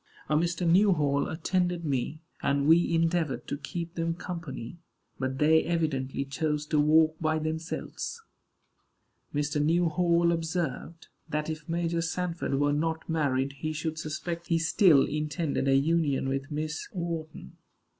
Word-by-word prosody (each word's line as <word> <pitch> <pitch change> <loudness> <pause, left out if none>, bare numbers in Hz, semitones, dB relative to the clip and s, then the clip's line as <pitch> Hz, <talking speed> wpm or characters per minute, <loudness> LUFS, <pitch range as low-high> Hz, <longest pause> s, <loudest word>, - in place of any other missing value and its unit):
A 150 - +2
Mr. 170 +2 +1
Newhall 165 -6 +3
attended 175 +1 -1
me, 145 +3 -2 0.2
and 140 0 +1
we 165 +3 +5
endeavored 165 -3 0
to - - -2
keep 170 +3 -5
them 165 -1 -1
company; 170 -5 -6 0.4
but 130 0 -2
they 160 +2 +4
evidently 140 -5 -1
chose 150 +1 -1
to 150 0 +1
walk 155 +1 +4
by 155 -1 +1
themselves. 160 - -4 1.1
Mr. 150 0 0
Newhall 170 +1 +3
observed, 165 -1 -3 0.2
that 150 +1 -1
if 155 +1 -8
Major 170 0 0
Sanford 165 -2 -2
were 145 +1 +2
not 160 +2 -1
married 140 -4 0
he 155 0 -2
should 155 0 -3
suspect 170 +2 -4
he 165 - +2
still 165 -3 +5
intended 150 -1 -2
a 135 - +4
union 145 -2 +2
with 135 +2 -2
Miss 155 +1 -3
Wharton. 165 - -5
160 Hz, 135 wpm, -28 LUFS, 145-170 Hz, 1.1 s, we